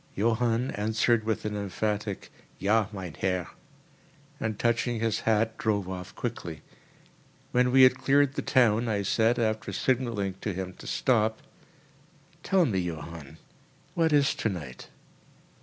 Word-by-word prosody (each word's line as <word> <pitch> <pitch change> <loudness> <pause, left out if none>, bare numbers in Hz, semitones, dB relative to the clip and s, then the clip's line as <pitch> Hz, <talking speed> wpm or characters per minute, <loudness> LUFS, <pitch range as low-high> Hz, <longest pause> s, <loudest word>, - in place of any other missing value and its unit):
Johann 115 +3 +1
answered 110 +2 +1
with 110 -1 -1
an 105 -1 -2
emphatic, 105 0 -3 0.3
"Ja, 105 +1 +2
mein 95 -5 -6
Herr," 90 -2 -1 0.9
and, 110 -2 -2
touching 120 0 0
his 110 -1 0
hat, 110 0 +2
drove 100 -4 0
off 90 -1 -7
quickly. 90 -10 -5 0.9
When 125 0 +3
we 130 0 +7
had 130 0 +6
cleared 140 +1 +3
the - - -2
town, 120 -5 +3
I 105 -3 0
said, 115 +4 +2
after 110 -2 -1
signalling 115 -7 -1
to 105 - -2
him 95 0 -4
to - - -10
stop: 110 -3 +1 1.0
"Tell 190 -3 +3
me, 100 -9 0
Johann, 80 -3 -6 0.6
what 165 -2 +2
is 145 -2 +4
tonight?" 80 - -4
110 Hz, 135 wpm, -28 LUFS, 95-120 Hz, 1.0 s, we